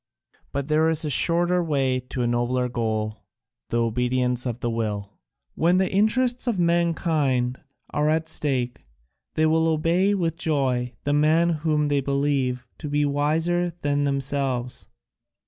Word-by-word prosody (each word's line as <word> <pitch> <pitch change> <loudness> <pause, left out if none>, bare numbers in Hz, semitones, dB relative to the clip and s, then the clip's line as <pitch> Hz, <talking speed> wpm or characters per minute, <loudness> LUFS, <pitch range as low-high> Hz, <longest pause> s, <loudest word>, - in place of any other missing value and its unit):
But 140 0 -3
there 155 +1 +3
is 160 0 -1
a 150 - -2
shorter 175 +3 +2
way 135 -5 +1
to 125 0 -4
a - - +1
nobler 120 +1 0
goal, 110 -3 -2 0.5
the 120 - 0
obedience 125 +2 0
of 120 -1 -4
the 120 - -2
will. 105 -3 -3 0.4
When 175 +3 +2
the 190 0 +1
interests 240 +5 +1
of 230 -5 +1
mankind 160 -7 +1 0.3
are 150 +1 +1
at 160 +1 0
stake, 125 - -1 0.5
they 155 - +3
will 160 +1 +3
obey 170 +5 +2
with 165 -4 -1
joy 130 -6 0
the 145 - 0
man 155 +3 +3
whom 155 -2 0
they 145 -1 +1
believe 135 -2 0
to 150 - -5
be 145 0 +1
wiser 160 +5 0
than 145 0 +1
themselves. 135 -2 -2
145 Hz, 145 wpm, -24 LUFS, 125-165 Hz, 0.5 s, there